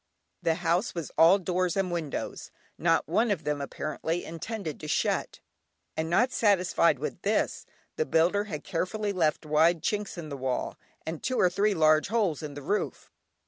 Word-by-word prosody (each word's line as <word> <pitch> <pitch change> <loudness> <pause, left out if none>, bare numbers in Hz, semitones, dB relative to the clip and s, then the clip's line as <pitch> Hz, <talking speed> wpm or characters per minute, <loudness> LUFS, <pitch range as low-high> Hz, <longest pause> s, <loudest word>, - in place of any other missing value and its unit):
The 165 -2 +2
house 175 +4 0
was 170 -3 -4
all 170 +4 +7
doors 180 -1 -1
and 190 -2 0
windows, 165 -5 -4 0.3
not 165 -2 +2
one 220 +9 +2
of 205 - -1
them, 150 -1 -1
apparently, 155 +4 -3
intended 165 0 -5
to 155 - -7
shut, - - -1 0.5
and 160 0 -2
not 245 +9 +3
satisfied 180 -7 +3
with 150 +5 -5
this, 210 +2 0 0.3
the 470 - +1
builder 180 +6 +2
had 155 -8 -6
carefully 200 +3 -2
left 160 -3 +1
wide 160 +2 +3
chinks 210 -3 -2
in 160 -3 -6
the 140 - -5
walls, 130 -1 -2 0.3
and 160 0 -5
two 255 - -1
or 180 - +4
three 200 +2 +2
large 155 -1 +4
holes 205 -8 0
in 150 -2 -6
the 145 - -8
roof. 205 +9 -2
170 Hz, 175 wpm, -28 LUFS, 155-200 Hz, 0.5 s, all